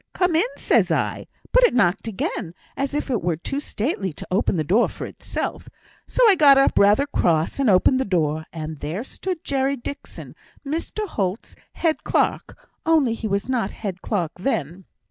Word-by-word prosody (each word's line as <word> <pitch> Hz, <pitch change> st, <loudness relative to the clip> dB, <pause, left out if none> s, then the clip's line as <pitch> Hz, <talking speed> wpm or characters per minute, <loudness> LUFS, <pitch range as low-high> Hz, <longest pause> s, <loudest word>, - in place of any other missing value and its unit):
'Come 360 Hz, -3 st, +1 dB
in!' 355 Hz, +9 st, +3 dB
says -, -, +2 dB
I; -, -, -1 dB, 0.2 s
but -, -, +5 dB
it 485 Hz, -, +4 dB
knocked 200 Hz, -2 st, +2 dB
again, 190 Hz, -4 st, -3 dB, 0.2 s
as 275 Hz, +1 st, -2 dB
if 295 Hz, -2 st, -2 dB
it 235 Hz, -, 0 dB
were 170 Hz, -1 st, 0 dB
too 275 Hz, -, -4 dB
stately 215 Hz, -, -2 dB
to -, -, -9 dB
open 190 Hz, -1 st, +1 dB
the 155 Hz, -, +1 dB
door 200 Hz, +10 st, +3 dB
for -, -, -7 dB
itself; -, -, -5 dB, 0.4 s
so -, -, +4 dB
I 420 Hz, -, +7 dB
got 290 Hz, -6 st, +6 dB
up, 275 Hz, -, +4 dB
rather 205 Hz, +8 st, +5 dB
cross, 170 Hz, -, 0 dB
and 270 Hz, -4 st, +3 dB
opened 200 Hz, +7 st, +4 dB
the -, -, +2 dB
door; 160 Hz, -4 st, 0 dB
and 155 Hz, -2 st, -6 dB
there 165 Hz, +9 st, -4 dB
stood 360 Hz, +5 st, -5 dB
Jerry 275 Hz, 0 st, 0 dB
Dixon, 280 Hz, +4 st, -8 dB, 0.3 s
Mr 330 Hz, +8 st, -3 dB
Holt's 195 Hz, -, -3 dB, 0.2 s
head 325 Hz, -2 st, 0 dB
clerk; -, -, 0 dB, 0.3 s
only 310 Hz, -8 st, +3 dB
he 225 Hz, -1 st, -4 dB
was 200 Hz, +1 st, -1 dB
not 245 Hz, -6 st, 0 dB
head 190 Hz, -4 st, -6 dB
clerk 180 Hz, -8 st, -1 dB
then. 180 Hz, -, -2 dB
225 Hz, 185 wpm, -23 LUFS, 180-280 Hz, 0.4 s, I